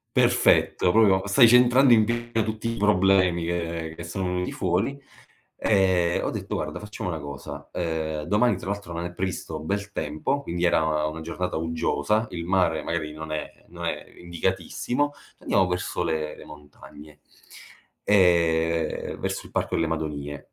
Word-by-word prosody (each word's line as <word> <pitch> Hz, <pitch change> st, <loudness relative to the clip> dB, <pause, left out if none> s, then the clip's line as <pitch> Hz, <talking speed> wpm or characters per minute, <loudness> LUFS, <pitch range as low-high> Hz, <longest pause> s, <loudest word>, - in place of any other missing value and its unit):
Perfetto, 90 Hz, -, +3 dB
proprio 100 Hz, -3 st, +4 dB
stai 115 Hz, +4 st, +7 dB
centrando 125 Hz, +2 st, +6 dB
in 110 Hz, -1 st, +6 dB
pieno 120 Hz, 0 st, -1 dB
tutti 110 Hz, +1 st, -3 dB
i -, -, -6 dB
problemi 95 Hz, -4 st, +3 dB
che 85 Hz, -2 st, -3 dB
che 85 Hz, -, -8 dB
sono 90 Hz, +2 st, -4 dB
venuti 90 Hz, 0 st, -2 dB
fuori, 100 Hz, +10 st, -1 dB, 0.6 s
ehm, 95 Hz, -4 st, +2 dB
ho -, -, -1 dB
detto: -, -, -5 dB
"Guarda, -, -, -3 dB
facciamo 105 Hz, -2 st, -5 dB
una 80 Hz, -, -3 dB
cosa, 70 Hz, 0 st, -8 dB
uhm, 80 Hz, -3 st, -2 dB
domani 105 Hz, +9 st, +2 dB
tra 95 Hz, -, -6 dB
l'altro 100 Hz, -4 st, -5 dB
non 85 Hz, +1 st, -3 dB
è 90 Hz, -, -5 dB
previsto 90 Hz, -3 st, -4 dB
bel 100 Hz, +5 st, -3 dB
tempo", 75 Hz, -, -2 dB
quindi 85 Hz, -3 st, -3 dB
era 80 Hz, -3 st, +2 dB
una 80 Hz, +1 st, -5 dB
giornata 85 Hz, +2 st, -4 dB
uggiosa, 80 Hz, +6 st, 0 dB
il 85 Hz, -1 st, -5 dB
mare 90 Hz, -4 st, +2 dB
magari 75 Hz, -2 st, -3 dB
non 80 Hz, 0 st, -7 dB
è 75 Hz, -, -3 dB, 0.2 s
non -, -, -8 dB
è -, -, -2 dB, 0.2 s
indicatissimo, 95 Hz, -, -2 dB, 0.3 s
"Andiamo 95 Hz, -2 st, +2 dB
verso 90 Hz, 0 st, -2 dB
le 80 Hz, -2 st, -2 dB
le -, -, -12 dB
montagne, 75 Hz, 0 st, -14 dB, 0.9 s
ehm, 85 Hz, -4 st, +2 dB
verso -, -, -3 dB
il -, -, -14 dB
Parco -, -, -1 dB
delle 80 Hz, -, +1 dB
Madonie." 75 Hz, -3 st, -5 dB
85 Hz, 160 wpm, -25 LUFS, 80-100 Hz, 0.9 s, stai